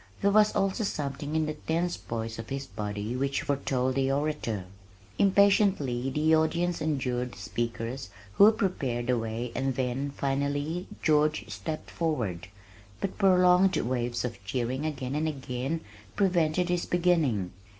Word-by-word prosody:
There 200 Hz, -, +4 dB
was 210 Hz, +1 st, +4 dB
also 195 Hz, +2 st, +1 dB
something 145 Hz, -4 st, -3 dB
in 160 Hz, 0 st, +2 dB
the 155 Hz, -, -2 dB
tense 165 Hz, +3 st, -1 dB
poise 115 Hz, -1 st, -5 dB
of 115 Hz, -, -7 dB
his 135 Hz, 0 st, -3 dB
body 105 Hz, +2 st, -4 dB
which 140 Hz, +3 st, -1 dB
foretold 135 Hz, -3 st, 0 dB
the 135 Hz, 0 st, +1 dB
orator. 140 Hz, -9 st, -1 dB, 0.5 s
Impatiently 195 Hz, -, +3 dB
the 155 Hz, +4 st, +3 dB
audience 170 Hz, +2 st, +1 dB
endured 125 Hz, -5 st, -1 dB
the -, -, -13 dB
speakers 115 Hz, +2 st, -4 dB, 0.2 s
who 205 Hz, -, +8 dB
prepared 135 Hz, -, -1 dB
the 125 Hz, -1 st, +1 dB
way 115 Hz, +2 st, -3 dB
and 135 Hz, -1 st, -1 dB
then, 130 Hz, +2 st, -1 dB
finally, 140 Hz, +5 st, -2 dB, 0.2 s
George 150 Hz, -6 st, +2 dB
stepped 105 Hz, +10 st, -5 dB
forward, 110 Hz, -, -2 dB, 0.5 s
but 195 Hz, -, -4 dB
prolonged 180 Hz, -2 st, +5 dB
waves 120 Hz, -1 st, -1 dB
of 115 Hz, -5 st, -6 dB
cheering 125 Hz, +7 st, -2 dB
again 135 Hz, -4 st, -4 dB
and 155 Hz, +2 st, 0 dB
again 135 Hz, +1 st, -3 dB, 0.3 s
prevented 180 Hz, -3 st, +2 dB
his 175 Hz, -1 st, 0 dB
beginning. 160 Hz, -, +2 dB
140 Hz, 140 wpm, -28 LUFS, 120-165 Hz, 0.5 s, who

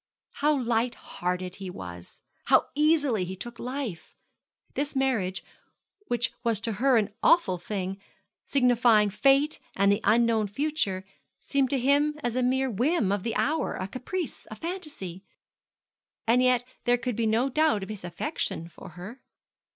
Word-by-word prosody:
How 295 Hz, 0 st, +2 dB
light 235 Hz, 0 st, 0 dB
hearted 180 Hz, +1 st, -4 dB
he 195 Hz, -2 st, -6 dB
was! 90 Hz, -, -9 dB
and -, -, -18 dB
how -, -, +5 dB
easily 290 Hz, -, +3 dB
he 185 Hz, +1 st, -5 dB
took 230 Hz, +5 st, -8 dB
life! 245 Hz, -, -5 dB, 0.6 s
This 290 Hz, 0 st, -2 dB
marriage, 230 Hz, -9 st, 0 dB, 0.6 s
which 240 Hz, 0 st, 0 dB
was 230 Hz, -3 st, +1 dB
to 225 Hz, -, -1 dB
her 265 Hz, -2 st, +5 dB
an 205 Hz, -2 st, 0 dB
awful 190 Hz, -, +4 dB
thing, 195 Hz, +1 st, -4 dB, 0.4 s
signifying 240 Hz, -5 st, +4 dB
fate 275 Hz, +7 st, +3 dB, 0.2 s
and 200 Hz, +1 st, +4 dB
the 200 Hz, +2 st, +1 dB
unknown 225 Hz, 0 st, +3 dB
future, 205 Hz, -5 st, -1 dB, 0.3 s
seemed 275 Hz, -2 st, 0 dB
to 280 Hz, -, +1 dB
him 290 Hz, +4 st, +2 dB
as 240 Hz, -1 st, -1 dB
a 255 Hz, -, +1 dB
mere 260 Hz, +2 st, +2 dB
whim 245 Hz, -, +1 dB
of 200 Hz, -1 st, 0 dB
the 225 Hz, +3 st, -3 dB
hour, 315 Hz, +3 st, 0 dB
a 185 Hz, -, -4 dB
caprice, 285 Hz, -, -5 dB
a 215 Hz, -, -7 dB
fancy. 295 Hz, -, -6 dB, 1.0 s
And 235 Hz, +3 st, +4 dB
yet 250 Hz, -1 st, +3 dB, 0.2 s
there 245 Hz, 0 st, +4 dB
could 245 Hz, -1 st, -3 dB
be 230 Hz, 0 st, 0 dB
no 225 Hz, +4 st, +2 dB
doubt 295 Hz, -6 st, +2 dB
of 190 Hz, -, -8 dB
his 210 Hz, -4 st, -6 dB
affection 170 Hz, -1 st, -3 dB
for 165 Hz, -, -12 dB
her. 215 Hz, +9 st, -9 dB
235 Hz, 160 wpm, -27 LUFS, 195-270 Hz, 1.0 s, how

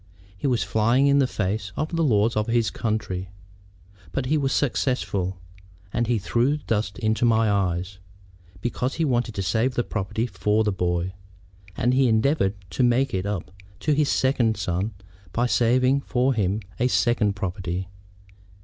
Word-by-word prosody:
He 95 Hz, -, -2 dB
was 120 Hz, -5 st, +1 dB
flying 110 Hz, +6 st, +2 dB
in 140 Hz, 0 st, +4 dB
the 135 Hz, -, +3 dB
face 105 Hz, -2 st, -2 dB
of 155 Hz, +2 st, -2 dB
the 165 Hz, -, +1 dB
laws 115 Hz, -4 st, +3 dB
of 105 Hz, 0 st, 0 dB
his 115 Hz, -1 st, +1 dB
country. 105 Hz, -5 st, -3 dB, 0.8 s
But 130 Hz, +7 st, -2 dB
he 145 Hz, +5 st, +1 dB
was 140 Hz, -3 st, +1 dB
successful; 115 Hz, -9 st, 0 dB, 0.6 s
and 120 Hz, -, 0 dB
he 120 Hz, -1 st, +2 dB
threw 120 Hz, +8 st, +1 dB
dust 105 Hz, -8 st, -2 dB
into 110 Hz, -1 st, 0 dB
my 115 Hz, -2 st, +3 dB
eyes, 95 Hz, -1 st, -1 dB, 0.6 s
because 125 Hz, +3 st, -2 dB
he 165 Hz, -, 0 dB
wanted 120 Hz, -4 st, 0 dB
to 95 Hz, -, -2 dB
save 115 Hz, +8 st, +1 dB
the 120 Hz, -, +1 dB
property 110 Hz, +2 st, -2 dB
for 105 Hz, 0 st, +1 dB
the 105 Hz, -, +1 dB
boy. 90 Hz, -1 st, -1 dB, 0.6 s
And 125 Hz, +2 st, +2 dB
he 130 Hz, 0 st, +4 dB
endeavored 110 Hz, -2 st, +2 dB, 0.2 s
to 85 Hz, -, -1 dB
make 125 Hz, +2 st, +3 dB
it 95 Hz, +1 st, -1 dB
up 100 Hz, -5 st, -4 dB, 0.3 s
to 155 Hz, -, +2 dB
his 145 Hz, 0 st, +2 dB
second 125 Hz, -4 st, +2 dB
son 95 Hz, +2 st, -2 dB, 0.4 s
by 120 Hz, -, +1 dB
saving 125 Hz, +3 st, +3 dB
for 130 Hz, 0 st, +1 dB
him 105 Hz, -1 st, 0 dB, 0.2 s
a 125 Hz, -, +3 dB
second 120 Hz, -5 st, +2 dB
property. 90 Hz, -1 st, -3 dB
110 Hz, 165 wpm, -24 LUFS, 100-125 Hz, 0.8 s, in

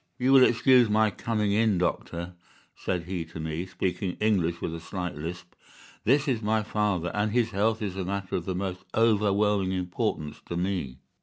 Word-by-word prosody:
"'You 130 Hz, +2 st, +3 dB
will 135 Hz, -1 st, +8 dB
excuse 125 Hz, 0 st, +5 dB
my 110 Hz, 0 st, +3 dB
coming 105 Hz, 0 st, -1 dB
in, 105 Hz, -1 st, +3 dB
doctor,' 85 Hz, 0 st, -2 dB, 0.4 s
said 90 Hz, -2 st, -2 dB
he 90 Hz, -1 st, -3 dB
to 80 Hz, +1 st, -10 dB
me, 80 Hz, +3 st, -3 dB
speaking 90 Hz, 0 st, -2 dB
English 90 Hz, -6 st, +1 dB
with 80 Hz, -, -3 dB
a 85 Hz, -, -5 dB
slight 90 Hz, +1 st, -4 dB
lisp. 85 Hz, +3 st, -7 dB, 0.5 s
'This 140 Hz, +5 st, +3 dB
is 125 Hz, -5 st, 0 dB
my 110 Hz, 0 st, +1 dB
father, 100 Hz, -5 st, -1 dB
and 105 Hz, +1 st, 0 dB
his 115 Hz, 0 st, +1 dB
health 110 Hz, +3 st, +1 dB
is 95 Hz, -3 st, -3 dB
a 95 Hz, -, -2 dB
matter 100 Hz, 0 st, -3 dB
of 85 Hz, -, -2 dB
the 95 Hz, -, -2 dB
most 95 Hz, 0 st, -4 dB
overwhelming 105 Hz, -3 st, +2 dB
importance 90 Hz, -5 st, -2 dB
to 85 Hz, -, -3 dB
me. 90 Hz, -8 st, -2 dB
95 Hz, 180 wpm, -27 LUFS, 90-110 Hz, 0.5 s, will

